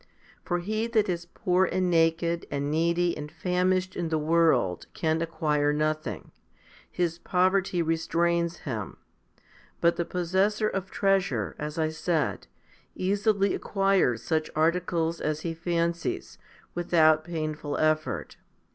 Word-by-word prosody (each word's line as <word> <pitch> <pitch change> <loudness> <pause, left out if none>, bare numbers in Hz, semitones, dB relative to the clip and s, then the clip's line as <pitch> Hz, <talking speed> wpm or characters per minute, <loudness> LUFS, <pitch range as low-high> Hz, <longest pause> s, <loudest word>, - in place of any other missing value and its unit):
For 175 - -1
he 215 +6 -2
that 220 -3 +2
is 170 -1 -3
poor 180 +1 +1
and 185 0 0
naked 165 0 +2
and 140 0 -2
needy 170 +2 +1
and 150 0 -7
famished 185 +1 0
in 170 -2 -2
the 160 - +1
world 155 - +2
can 160 0 0
acquire 150 -3 +1
nothing; 155 +1 -2 0.6
his 170 -1 -1
poverty 185 -1 +1
restrains 170 +1 0
him; 115 -8 -4 0.8
but 170 0 +3
the 170 - +1
possessor 190 +5 +1
of 195 -2 -3
treasure, 190 - 0
as 150 +1 -5
I 160 -1 +1
said, 160 0 -1 0.5
easily 200 +1 +1
acquires 195 - +1
such 155 -1 0
articles 165 +1 +1
as 155 0 -1
he 165 0 -3
fancies, 170 0 -2 0.3
without 160 -3 +3
painful 155 -3 -3
effort. 155 0 0
170 Hz, 125 wpm, -27 LUFS, 155-180 Hz, 0.8 s, but